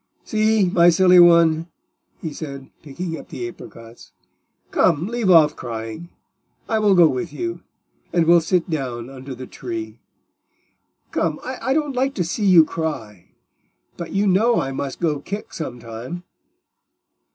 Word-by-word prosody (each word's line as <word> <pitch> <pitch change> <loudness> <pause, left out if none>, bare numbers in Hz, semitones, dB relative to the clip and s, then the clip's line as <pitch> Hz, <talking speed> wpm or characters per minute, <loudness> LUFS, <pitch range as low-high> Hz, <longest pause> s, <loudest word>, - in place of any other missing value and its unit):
"See, 215 -2 +2
my 175 -1 +5
silly 180 +1 +5
one," 170 -1 +5 0.6
he 160 -3 -4
said, 140 -3 -8
picking 160 +3 -6
up - - -13
the 360 - -5
apricots. 115 - -13 0.6
"Come, 170 0 +2
leave 235 -3 -1
off 155 -4 +6
crying, 115 +8 -7 0.6
I 220 - +1
will 205 -2 +4
go 175 -2 +7
with 140 +4 -3
you, 175 +3 -5 0.5
and 170 -2 +2
we'll 170 +1 +6
sit 175 +1 0
down 130 -6 -4
under 130 0 -8
the 130 +1 -8
tree. 335 - -7 1.1
Come, - - -1
I 265 - -2
don't 295 -3 -1
like 270 +2 0
to 180 - 0
see 200 +5 -2
you 175 -4 +7
cry; 120 - -6 0.6
but 170 -2 -7
you 200 +1 +1
know 210 +5 +3
I 135 - -2
must 135 0 -5
go 155 -4 0
back 200 +8 -7
some 140 -7 -5
time." 120 +10 -8
170 Hz, 150 wpm, -21 LUFS, 140-190 Hz, 1.1 s, go